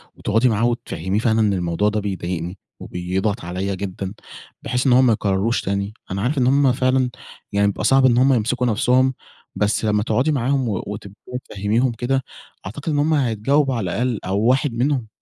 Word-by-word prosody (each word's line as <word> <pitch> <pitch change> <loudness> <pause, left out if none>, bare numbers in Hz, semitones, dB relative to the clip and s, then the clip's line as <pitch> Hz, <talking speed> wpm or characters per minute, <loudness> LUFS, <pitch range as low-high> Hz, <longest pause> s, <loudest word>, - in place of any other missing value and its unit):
وتقعُدي 115 +4 +2
معاه 110 +1 +1
وتفهّميه 110 -4 -2
فعلًا 110 0 +2
أن 105 -2 +3
الموضوع 90 +2 0
ده 105 0 -1
بيضايقني 90 -3 -4 0.2
وبيضغط 95 +5 -3
عليَّ 95 +3 -3
جدًا، 95 0 -5 0.5
بحيث 125 +2 0
إن 125 - +5
هو 125 - +6
ما 125 -3 +4
يكرّرهوش 105 +2 0
تاني؟ 100 +2 -2 0.2
أنا 95 +1 -2
عارف 130 +7 0
إن 125 -2 +3
هُم 135 0 +4
فعلًا 130 0 +1 0.4
يعني 100 0 +2
بيبقى 100 - -2
صعب 135 +4 +5
إن 120 -2 +4
هُم 135 +2 +5
يمسِكوا 125 +2 0
نفْسهم، 125 +4 +2 0.4
بس 105 +1 0
لمّا 105 -1 +2
تقعُدي 125 +8 +1
معاهم 135 -2 0
و 100 - -2
وتبدئي 105 +4 -7
تفهّميهم 110 +6 0
كده، 130 +3 -1 0.4
أعتقد 140 +11 -5
إن 145 - +1
هُم 155 +2 +2
هيتجاوبوا 135 +1 +1
على 95 -7 -2
الأقل 120 -2 -1
أو 95 +2 0
واحد 130 +4 +2
منهم. 125 0 0
115 Hz, 180 wpm, -21 LUFS, 100-130 Hz, 0.5 s, هو